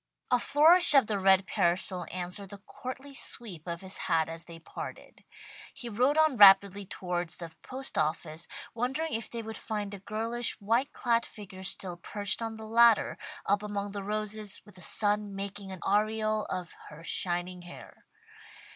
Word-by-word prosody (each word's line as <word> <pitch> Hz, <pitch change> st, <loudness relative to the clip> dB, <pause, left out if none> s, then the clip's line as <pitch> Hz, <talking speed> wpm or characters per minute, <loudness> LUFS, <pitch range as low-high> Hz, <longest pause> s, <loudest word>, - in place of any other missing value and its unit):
A 250 Hz, -, +5 dB
flourish 315 Hz, +5 st, +6 dB
of 270 Hz, -4 st, +7 dB
the 210 Hz, -2 st, -1 dB
red 190 Hz, 0 st, +5 dB
parasol 175 Hz, 0 st, 0 dB
answered 185 Hz, +2 st, -4 dB
the 205 Hz, -, -9 dB
courtly 260 Hz, +7 st, -8 dB
sweep 195 Hz, -, -3 dB
of 170 Hz, -1 st, -4 dB
his 190 Hz, 0 st, -6 dB
hat 165 Hz, -2 st, +2 dB
as 165 Hz, 0 st, -6 dB
they 170 Hz, -1 st, -10 dB
parted. 165 Hz, -, -9 dB, 0.5 s
He 240 Hz, -, -5 dB
rode 250 Hz, +7 st, +2 dB
on 315 Hz, -5 st, +4 dB
rapidly 200 Hz, -1 st, +7 dB
towards 175 Hz, -3 st, -3 dB
the 170 Hz, -2 st, -7 dB
post 265 Hz, +1 st, -5 dB
office, 155 Hz, +1 st, -2 dB, 0.3 s
wondering 265 Hz, +7 st, -2 dB
if 225 Hz, 0 st, -3 dB
they 230 Hz, -1 st, -5 dB
would 220 Hz, 0 st, -6 dB
find 210 Hz, -2 st, -4 dB
the 200 Hz, -, -7 dB
girlish, 225 Hz, +3 st, -2 dB
white 230 Hz, +7 st, +1 dB
clad 235 Hz, -2 st, +1 dB
figure 190 Hz, -3 st, -10 dB
still 185 Hz, -1 st, -3 dB
perched 205 Hz, +5 st, -3 dB
on 225 Hz, -1 st, -4 dB
the 220 Hz, -, -8 dB
ladder, 230 Hz, 0 st, +4 dB, 0.3 s
up 200 Hz, +1 st, +2 dB
among 205 Hz, -1 st, -4 dB
the 200 Hz, 0 st, -5 dB
roses, 210 Hz, 0 st, -2 dB
with 205 Hz, -, -16 dB
the 185 Hz, -, -12 dB
sun 205 Hz, 0 st, 0 dB
making 200 Hz, 0 st, -6 dB
an 185 Hz, -, -8 dB
aureole 215 Hz, +1 st, +1 dB
of 180 Hz, -2 st, -5 dB, 0.2 s
her 155 Hz, +2 st, -12 dB
shining 175 Hz, +1 st, -2 dB
hair. 175 Hz, 0 st, -13 dB
205 Hz, 170 wpm, -30 LUFS, 185-230 Hz, 0.5 s, of